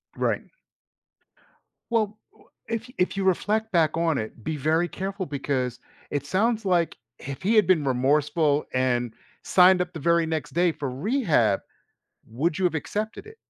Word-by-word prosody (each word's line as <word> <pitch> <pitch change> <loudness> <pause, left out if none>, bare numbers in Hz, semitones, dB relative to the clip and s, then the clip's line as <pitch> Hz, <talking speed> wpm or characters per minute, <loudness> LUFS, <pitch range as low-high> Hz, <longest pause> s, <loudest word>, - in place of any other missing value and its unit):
Right. - - 0 1.5
Well, 215 -2 0
w - - -24 0.2
if 230 +2 -4
if 180 +2 +1
you 195 - -1
reflect 215 +4 +1
back 160 -3 +2
on 165 -4 +1
it, 110 +1 -6
be 155 +5 -3
very 160 +5 +1
careful 195 0 -4
because 135 -4 -2 0.3
it 145 -1 -2
sounds 215 +6 +1
like 175 -3 +1 0.2
if 135 -1 -7
he 215 +5 +2
had 215 - +6
been 175 -5 +4
remorseful 145 +3 +2
and 125 -2 0 0.3
signed 180 0 +5
up 180 0 -4
the 160 - -6
very 170 +2 +3
next 155 -3 -3
day 175 0 +3
for 140 - -4
rehab, 150 - +1 0.7
would 150 +9 -1
you 185 - +2
have 170 - +1
accepted 215 - -4
it? 440 - -13
165 Hz, 160 wpm, -25 LUFS, 140-195 Hz, 1.5 s, had